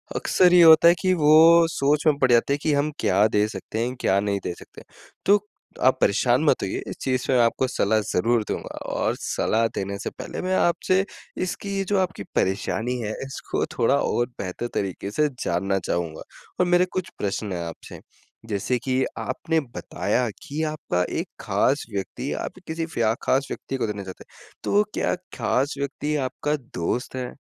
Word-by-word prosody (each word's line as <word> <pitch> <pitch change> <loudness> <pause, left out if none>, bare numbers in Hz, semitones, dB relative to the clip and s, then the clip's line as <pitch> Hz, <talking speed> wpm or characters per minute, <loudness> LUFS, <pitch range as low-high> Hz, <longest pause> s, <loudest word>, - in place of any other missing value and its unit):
अक्सर 180 -1 +3
ये 180 - +8
होता 160 0 +8
है 170 - +8
कि 185 -1 +3
वो 165 +1 +6
सोच 145 +2 +1
में 150 -2 +4
पड़ 130 -2 +3
जाते 120 +4 +4
हैं 145 - -1
कि 155 - +2
हम 145 +2 +1
क्या 100 +3 +3
दे 105 -1 +2
सकते 110 +1 -6
हैं, 125 +1 -4
क्या 95 +1 +3
नहीं 100 -1 -1
दे 90 - -3
सकते? - - -14 0.4
तो 205 +1 +5 0.4
आप - - +4
परेशान - - +3
मत - - +3
होइए - - -3
इस - - -5
चीज़ 130 -1 -1
में 130 - +3
मैं 120 - +5
आपको 115 +3 +1
सलाह 110 -3 +1
ज़रूर 115 +4 +2
दूँगा। - - -4 0.2
और - - 0
सलाह 115 +1 +1
देने 100 +1 -3
से - - -3
पहले - - -7
मैं 185 +1 0
आपसे 185 +2 +2 0.4
इसकी 195 +2 -4
ये 195 - 0
जो 205 - +2
आपकी 185 0 -2
परेशानी 110 +5 0
है 110 -2 -3
इसको 135 - -3
थोड़ा 120 +3 +3
और 120 -3 +1
बेहतर 95 +6 -4
तरीके 100 +1 -3
से 150 +7 +2 0.2
जानना 95 +3 0
चाहूँगा। 85 -2 -2 0.4
और 180 - +4
मेरे 175 +1 +4
कुछ 185 -1 -3
प्रश्न 100 0 -3
हैं 85 -1 -3
आपसे, 85 - -9 0.5
जैसे 105 +3 -1
कि 130 0 +1
आपने 160 +5 -1 0.2
बताया 125 -2 -1 0.2
कि 150 +3 -3
आपका 90 -12 -1 0.2
एक - - -3
ख़ास 145 +1 +1
व्यक्ति 120 +7 -4
आप 185 - -7
किसी 160 +1 -2
फया 115 -9 0
ख़ास 135 +1 +1
व्यक्ति 135 - -4
को 115 - -1
देना 105 -1 -4
चाहते 95 -1 -9
हैं। - - -19
तो 205 +1 +3
क्या - - 0 0.2
ख़ास 130 +5 0
व्यक्ति 145 +2 -2
आपका 150 +3 -2 0.2
दोस्त 120 +10 -2
है 125 -1 -4
130 Hz, 190 wpm, -24 LUFS, 105-160 Hz, 0.5 s, ये